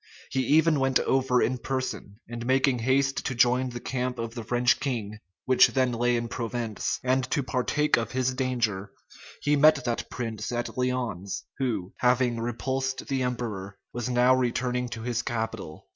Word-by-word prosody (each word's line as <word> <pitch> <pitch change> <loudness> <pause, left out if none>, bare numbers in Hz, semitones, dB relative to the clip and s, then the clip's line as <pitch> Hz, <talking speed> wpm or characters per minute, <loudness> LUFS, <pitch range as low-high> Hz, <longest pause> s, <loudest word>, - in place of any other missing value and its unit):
He 130 - 0
even 160 0 +4
went 135 -1 +3
over 130 -2 +2
in 125 +1 0
person; 130 -6 -4
and 120 0 -6
making 130 0 +2
haste 135 +3 +1
to 130 - -3
join 125 +2 +3
the 120 0 -6
camp 125 0 -3
of 115 -1 -4
the 120 -2 -6
French 120 +1 +2
king, 110 -6 -3 0.3
which 130 -1 +6
then 130 -2 +1
lay 120 +1 +1
in 115 0 -2
Provence, 115 -2 -3
and 130 +1 +2
to 140 - 0
partake 140 +4 +1
of 115 -1 -2
his 130 0 +1
danger, 120 -7 -1 0.5
he 150 0 +3
met 150 -2 +5
that 120 -2 -2
prince 115 -1 -4
at 120 0 -3
Lyons, 125 -7 -2 0.2
who, 110 -9 -2
having 125 -1 +2
repulsed 130 +3 -2
the 135 -1 0
emperor, 110 -6 -3 0.2
was 120 0 -3
now 125 +1 +4
returning 125 0 0
to 115 -1 -6
his 120 0 -1
capital. 110 -9 -4
125 Hz, 170 wpm, -27 LUFS, 115-130 Hz, 0.5 s, which